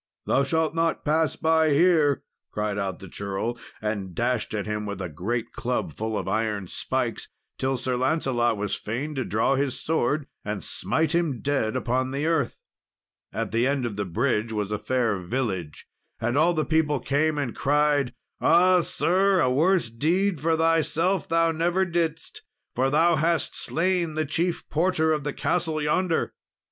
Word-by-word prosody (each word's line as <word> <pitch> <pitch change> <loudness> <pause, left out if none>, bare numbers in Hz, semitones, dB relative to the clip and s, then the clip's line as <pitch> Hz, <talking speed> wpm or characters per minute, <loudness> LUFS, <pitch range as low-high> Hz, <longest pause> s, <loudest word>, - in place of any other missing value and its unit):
"Thou 135 - +2
shalt 160 +2 0
not 165 0 0
pass 155 +1 +2
by 160 -1 +3
here," 155 -3 +3 0.3
cried 105 -1 -2
out 95 -2 -2
the 95 - -11
churl, 100 +5 -3 0.3
and 100 -4 -3
dashed 120 -1 0
at 105 - -2
him 105 0 -3
with 100 -1 -5
a 90 -2 -4
great 115 +9 -3
club 125 0 -2
full 110 0 -3
of - - -4
iron 105 -1 -1
spikes, - - -2 0.3
till 135 0 0
Sir 125 0 -1
Lancelot 125 -4 +1
was 105 0 -2
fain 130 +8 -3
to 135 -2 -2
draw 110 +5 +1
his 135 -1 -1
sword 150 -1 0 0.2
and 105 -4 -4
smite 160 0 -1
him 165 -7 0
dead 135 -5 0
upon 130 +1 0
the 140 +3 -2
earth. 160 -6 0 0.7
At - - -3
the 115 +3 +2
end 140 -2 0
of 115 -4 -3
the 100 0 -2
bridge 110 +4 0
was 105 -2 -2
a 105 - -1
fair 115 -6 0
village, 95 - -3 0.3
and 120 +3 -1
all 165 +4 +3
the 155 - 0
people 155 -3 +1
came 150 +4 +1
and 140 -5 -2
cried, 145 -2 +2 0.3
"Ah, 180 +2 +5
sir! 190 +3 +2
a 130 - +3
worse 160 -1 +2
deed 170 - +1
for 160 +1 +2
thyself 165 +2 +1
thou 165 0 +3
never 175 +4 +1
didst, 170 -3 -2 0.3
for 130 +2 +1
thou 160 +3 +3
hast 165 +2 +1
slain 170 -2 0
the 155 0 0
chief 170 +4 -1
porter 160 -1 +2
of 150 -2 -2
the 145 - -2
castle 160 0 -1
yonder!" 165 +3 0
140 Hz, 170 wpm, -25 LUFS, 115-160 Hz, 0.7 s, Ah